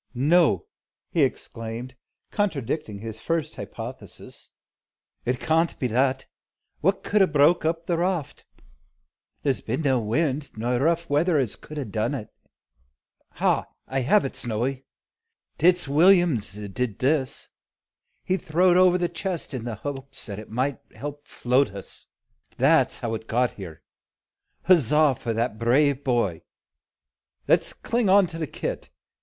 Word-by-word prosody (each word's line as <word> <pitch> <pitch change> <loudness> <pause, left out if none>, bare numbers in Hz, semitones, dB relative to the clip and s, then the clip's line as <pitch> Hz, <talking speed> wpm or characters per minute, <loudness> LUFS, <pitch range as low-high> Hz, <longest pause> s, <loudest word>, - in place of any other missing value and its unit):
"No!" 165 - +3 0.5
he 170 - +1
exclaimed, 120 -2 -3 0.4
contradicting 150 - -2
his 110 +1 -8
first 165 -3 -1
hypothesis, - - -9 0.8
"It 125 +1 0
can't 165 +1 +1
be - - -2
that. 130 +3 +1 0.5
What 195 +4 +1
could 210 0 +2
'a 190 - +6
broke 155 +2 +3
up 165 +1 -1
the 170 -1 0
raft? 175 -5 -2 1.0
There 140 - +3
's - - -10
been 130 +8 -3
no 135 -3 +3
wind, 140 +4 -1
nor 120 +2 0
rough 170 +4 +1
weather, 155 +3 +2
as 130 -7 0
could 155 - -11
'a 145 - -2
done 110 +5 -1
it. 110 -6 -7 1.0
Ha! - - +1 0.2
I 135 - -1
have 145 +10 +3
it, 135 - -4
Snowy. 125 +3 -2 0.7
It's 175 0 +4
Will'm 170 - +5
's 100 - -5
did 105 +2 -4
this. 135 -1 0 0.7
He's 185 +1 -1
throwed 175 +3 +3
over 180 -1 +5
the 175 -1 0
chest 170 -2 -4
in 125 -3 -4
the 115 -2 -3
behopes 135 -2 -6
it 105 +1 -7
might 130 +5 -1 0.2
help 145 0 -7
float 125 -3 +1
us. 100 - -9 0.5
That's - - +3
how 115 -1 -2
it's 110 0 -5
got 120 +2 +1
here. 85 -5 -10 0.8
Huzza 150 -4 +4
for 115 -2 -4
that 115 -1 -1
brave 140 +4 +2
boy! 115 - 0 1.1
Let's - - +3
cling 235 -3 -1
on 195 0 +6
to 165 -1 -7
the 160 - -2
kit. - - -5
140 Hz, 145 wpm, -25 LUFS, 120-165 Hz, 1.1 s, a